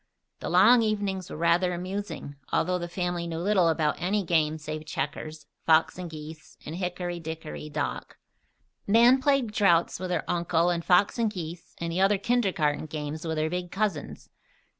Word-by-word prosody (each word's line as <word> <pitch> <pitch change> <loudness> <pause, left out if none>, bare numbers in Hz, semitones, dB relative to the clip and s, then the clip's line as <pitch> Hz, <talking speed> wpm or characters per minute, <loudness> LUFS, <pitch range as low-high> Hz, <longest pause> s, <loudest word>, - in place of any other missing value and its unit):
The - - -4
long 245 0 +6
evenings 200 -4 -1
were - - -7
rather 170 +2 +2
amusing, 185 -5 -5 0.2
although 180 +2 +1
the 175 - -4
family 175 -1 -2
knew 165 -1 -4
little 185 0 +3
about 160 -1 +1
any 200 +3 +1
game 160 -3 +1
save 155 0 -6
checkers, 155 +1 -4 0.2
"fox 160 0 +4
and 180 -2 -5
geese," 155 0 -10
and 160 +3 -5
"hickory, 175 -1 -3
dickory, 160 -1 -7
dock." 145 -1 -4 0.7
Nan 235 +5 +6
played 275 -5 +2
draughts 175 -7 +3
with 185 0 -4
her 180 - 0
uncle 170 0 +1
and 170 -1 -2
fox 185 +6 +3
and 230 -2 +2
geese 170 -4 -8
and 170 0 -3
the 180 +3 0
other 195 +1 +4
kindergarten 190 -10 0
game 150 -1 -4
with 160 -2 -3
her 155 0 +1
big 180 +2 -3
cousins. 195 -6 -3
175 Hz, 170 wpm, -27 LUFS, 160-195 Hz, 0.7 s, long